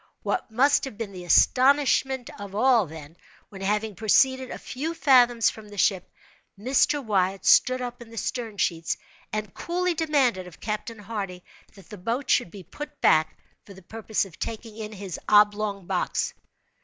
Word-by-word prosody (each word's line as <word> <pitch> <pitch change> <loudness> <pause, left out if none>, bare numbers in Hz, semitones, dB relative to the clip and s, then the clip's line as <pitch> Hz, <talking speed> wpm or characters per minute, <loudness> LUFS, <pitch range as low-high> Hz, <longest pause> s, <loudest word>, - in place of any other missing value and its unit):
What 365 - -2
must 270 +7 +3
have 265 -6 -8
been 225 -3 -5
the 180 -2 -9
astonishment 265 - +3
of 200 -1 -8
all, 235 -3 +4
then, 155 0 -11 0.3
when 195 -2 -11
having 210 +2 -1
proceeded 260 +5 +2
a - - -6
few 315 +6 -5
fathoms 245 -5 +4
from 215 -1 -13
the 205 - -12
ship, 185 0 +1 0.5
Mr. 265 +5 +1
Wyatt 195 -2 0
stood 255 0 +4
up 245 0 -6
in 235 - -11
the 230 - -12
stern 225 -2 -4
sheets, 165 -3 -1 0.3
and 215 -2 -4
coolly 360 +1 -1
demanded 275 - +1
of 175 - -14
Captain 215 +2 -4
Hardy 195 -4 -6 0.3
that 195 +2 -17
the 210 - -9
boat 240 +8 -2
should - - +2
be 195 +1 -11
put 295 - -9
back 155 0 +3 0.3
for 200 - -14
the 190 - -15
purpose 220 +2 -2
of 185 -4 -15
taking 225 -1 -6
in 215 -1 -7
his 195 -5 -7
oblong 210 -2 +3
box! - - -1
215 Hz, 170 wpm, -25 LUFS, 195-255 Hz, 0.5 s, all